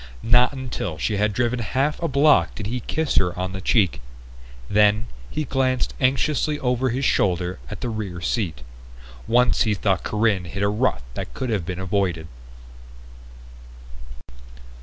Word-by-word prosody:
Not 120 +2 +5
until 125 - -5
she 105 +7 -1
had 105 +1 +2
driven 120 +4 0
half 135 - -1
a 170 - 0
block 145 +1 +4
did 105 - -6
he 120 +5 -2
kiss 155 +6 -2
her 90 -1 +2
on 90 0 -2
the 95 0 -6
cheek. 95 - +2 0.7
Then 105 - +3 0.2
he 155 - -2
glanced 130 -2 0
anxiously 145 +3 +1
over 125 0 0
his 130 +3 -1
shoulder 90 -3 +1
at - - -7
the 125 - -2
rear 105 -6 -4
seat. 85 - -2 0.6
Once 125 0 +3
he 110 -2 +2
thought 95 -2 0
Corinne 105 -4 0
hit 100 +4 -4
a 100 - +3
rut 110 - 0
that - - -6
could 130 - -3
have 95 -6 -1
been 90 - -3
avoided. 95 -4 -1
110 Hz, 155 wpm, -23 LUFS, 95-130 Hz, 0.7 s, Not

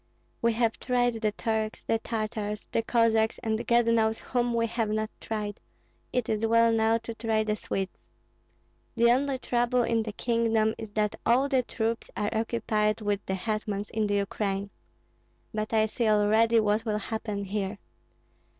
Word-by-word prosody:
We 235 0 +3
have 225 0 0
tried 245 -2 +1
the 215 -2 +1
Turks, 220 0 -2
the 225 - 0
Tartars, 215 -2 -3
the - - +1
Cossacks, 225 -1 +2
and 220 -1 -1
God 235 0 +4
knows 225 -1 +2
whom 240 -1 -1
we 230 0 +2
have 225 -1 -1
not 215 +1 -1
tried; 210 -2 -4 0.5
it 250 -2 0
is 215 0 -1
well 230 +1 +4
now 225 0 +3
to 230 0 -7
try 225 -1 0
the 215 -1 0
Swedes. 195 0 -4 1.0
The 235 0 +5
only 270 +2 +1
trouble 245 0 +1
in 230 -1 +1
the 215 -1 -5
kingdom 225 -1 +1
is 220 -2 -6
that 210 -1 0
all 255 +4 +3
the 265 -2 +2
troops 230 -1 -3
are 210 +1 -1
occupied 220 -1 0
with 205 -1 -1
the 190 - 0
hetmans 210 0 -3
in 215 -1 0
the 205 - 0
Ukraine. 200 0 -2 0.8
But 215 0 -2
I 220 -1 +4
see 225 +1 -1
already 220 +2 +4
what 215 +1 +1
will 215 -2 -1
happen 210 -1 -4
here. 200 0 -3
220 Hz, 170 wpm, -28 LUFS, 210-230 Hz, 1.0 s, The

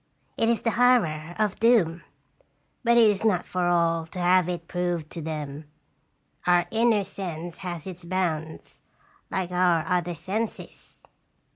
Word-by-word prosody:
It 225 - +1
is 235 - +1
the 230 - +2
horror 175 -11 +2
of 215 -2 0
Doom. 205 -8 +3 0.8
But 235 0 +4
it 230 -2 +7
is 205 -1 +1
not 210 -5 +2
for 180 -1 -1
all 165 -2 +1
to 175 - -11
have 180 0 +3
it 170 -1 -4
proved 175 -3 -2
to 170 - -6
them. 150 -1 -5 0.8
Our 175 -1 +4
inner 225 -2 +3
sense 175 -3 -6
has 175 -4 -6
its 180 -2 -8
bounds, 170 -3 -3 0.5
like 185 -2 -2
our 180 -3 +2
other 175 -2 -1
senses." 200 +7 -6
180 Hz, 145 wpm, -26 LUFS, 165-200 Hz, 0.8 s, it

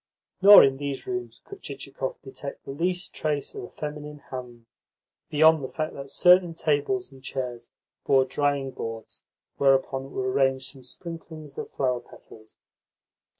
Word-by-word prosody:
Nor 200 +2 +11
in 135 -1 +3
these 140 -1 -4
rooms 370 -1 -5
could 400 -1 -11
Chichikov - - -5
detect 145 - -8
the - - -6
least 180 +5 -2
trace 150 -2 -2
of - - -6
a - - -12
feminine 150 0 -6
hand, 120 -3 -7 0.6
beyond 155 0 +5
the - - -2
fact 155 +3 -4
that 140 0 -8
certain 180 0 +5
tables 155 +4 0
and 135 -1 -16
chairs 125 -3 -5 0.4
bore 135 -1 +5
drying 140 -1 0
boards 115 -2 -7 0.4
whereon 135 0 +2
were 130 0 -1
arranged 135 0 +1
some 135 - -12
sprinklings 160 +2 -9
of - - -5
flower 125 -2 0
petals. 110 -2 -17
140 Hz, 150 wpm, -26 LUFS, 130-160 Hz, 0.6 s, Nor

